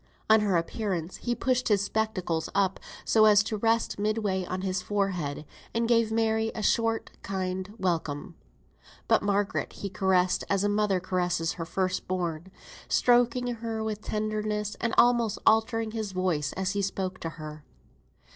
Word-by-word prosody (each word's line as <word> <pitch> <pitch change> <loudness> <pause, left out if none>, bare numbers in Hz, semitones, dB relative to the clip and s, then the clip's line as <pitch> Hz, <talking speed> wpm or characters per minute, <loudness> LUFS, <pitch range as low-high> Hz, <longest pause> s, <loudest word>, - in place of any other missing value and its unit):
On 220 - +8
her 200 -4 +2
appearance 175 -1 -3
he 240 -1 -2
pushed 250 +1 0
his 205 -2 +3
spectacles 200 -6 -1
up 195 -1 +2 0.3
so 220 -1 +5
as 210 -1 +6
to 215 +1 -3
rest 225 0 +1
midway 210 -3 0
on 185 +1 -4
his 185 -1 -1
forehead, 180 -7 -2 0.3
and 230 0 +1
gave 230 -2 +3
Mary 220 0 +1
a 215 - -4
short, 225 0 +1
kind 185 0 -3
welcome. 165 -5 -2 0.7
But - - +4
Margaret 205 0 0
he 200 - -6
caressed 185 -2 +2
as 195 -1 +2
a 205 - +2
mother 205 -2 +2
caresses 180 -2 0
her 165 - -5
first 185 +2 -2
born; 175 -2 -2 0.4
stroking 245 0 +3
her 225 -1 -3
with 215 -1 -3
tenderness, 210 -1 -2
and 230 -1 0
almost 240 -3 +4
altering 225 0 +3
his 215 -3 -4
voice 175 -6 0
as 190 0 -1
he 205 0 -1
spoke 190 -1 -3
to 165 - -4
her. 155 -1 -8
200 Hz, 155 wpm, -28 LUFS, 185-220 Hz, 0.7 s, On